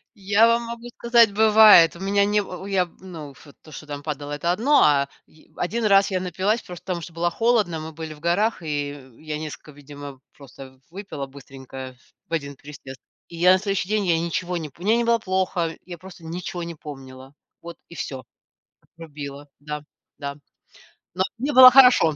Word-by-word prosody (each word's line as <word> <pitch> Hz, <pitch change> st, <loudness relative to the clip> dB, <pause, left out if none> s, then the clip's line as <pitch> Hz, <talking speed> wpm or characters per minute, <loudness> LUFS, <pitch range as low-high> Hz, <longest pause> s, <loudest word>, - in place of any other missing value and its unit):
Я 205 Hz, +2 st, +3 dB
вам 235 Hz, 0 st, +2 dB
могу 235 Hz, +1 st, -8 dB
сказать: 235 Hz, -2 st, +4 dB
бывает. 215 Hz, -6 st, +7 dB
У 170 Hz, -, -12 dB
меня 200 Hz, +1 st, +1 dB
не 210 Hz, +1 st, +1 dB
н 190 Hz, -2 st, -6 dB
я 195 Hz, -2 st, +1 dB
в -, -, -19 dB
в -, -, -23 dB
ну 160 Hz, -6 st, -9 dB
вот 145 Hz, -, -17 dB
то, 155 Hz, -, -16 dB
что 155 Hz, -, -10 dB
там 145 Hz, -1 st, -7 dB
падало- 145 Hz, -1 st, -6 dB
это 160 Hz, +4 st, -1 dB
одно, 240 Hz, +11 st, +3 dB
а 140 Hz, -2 st, +3 dB, 0.2 s
ви 155 Hz, -, -24 dB
а -, -, -8 dB
1 220 Hz, +5 st, -1 dB
раз 195 Hz, -1 st, +4 dB
я 185 Hz, -, 0 dB
напилась, 190 Hz, +5 st, -1 dB
просто, 180 Hz, -1 st, -11 dB
потому 180 Hz, -2 st, -3 dB
что 165 Hz, +1 st, -10 dB
было 170 Hz, +1 st, 0 dB
холодно, 215 Hz, -5 st, +1 dB
мы 160 Hz, +1 st, -7 dB
были 160 Hz, 0 st, -7 dB
в 150 Hz, -, -16 dB
горах, 180 Hz, +5 st, 0 dB
и 145 Hz, -2 st, -3 dB
в 130 Hz, -4 st, -15 dB
я 155 Hz, -1 st, -5 dB
несколько, 155 Hz, 0 st, -8 dB
видимо, 145 Hz, -1 st, -11 dB, 0.2 s
просто 135 Hz, -1 st, -14 dB
выпила 175 Hz, -6 st, -7 dB
быстренько, 135 Hz, -1 st, -11 dB, 0.3 s
в -, -, -11 dB
1 140 Hz, -3 st, -3 dB
присест. 135 Hz, -1 st, -12 dB, 0.3 s
И 170 Hz, -, -11 dB
я 180 Hz, +2 st, +5 dB
на 185 Hz, -, +2 dB
следующий 195 Hz, -2 st, -2 dB
день, 210 Hz, -1 st, 0 dB
я 170 Hz, -2 st, +2 dB
ничего 175 Hz, +2 st, -3 dB
не 160 Hz, -3 st, -6 dB
пом 170 Hz, -, -15 dB
Мне 225 Hz, +2 st, +3 dB
не 235 Hz, -, +1 dB
было 235 Hz, 0 st, +2 dB
плохо, 185 Hz, -4 st, -1 dB
я 175 Hz, -2 st, -9 dB
просто 180 Hz, -1 st, -14 dB
ничего 175 Hz, +1 st, -5 dB
не 170 Hz, 0 st, -7 dB
помнила, 135 Hz, -3 st, -11 dB, 0.3 s
вот 170 Hz, 0 st, -10 dB
и 170 Hz, -, -12 dB
всё, 135 Hz, -3 st, -6 dB, 0.6 s
отрубило, 145 Hz, -3 st, -10 dB
да, 150 Hz, 0 st, -6 dB, 0.3 s
да. 140 Hz, -1 st, -6 dB, 0.8 s
Но 185 Hz, +1 st, 0 dB
мне 275 Hz, +5 st, -2 dB
было 255 Hz, -1 st, +10 dB
хорошо, 250 Hz, -, +6 dB
170 Hz, 205 wpm, -23 LUFS, 145-200 Hz, 0.8 s, было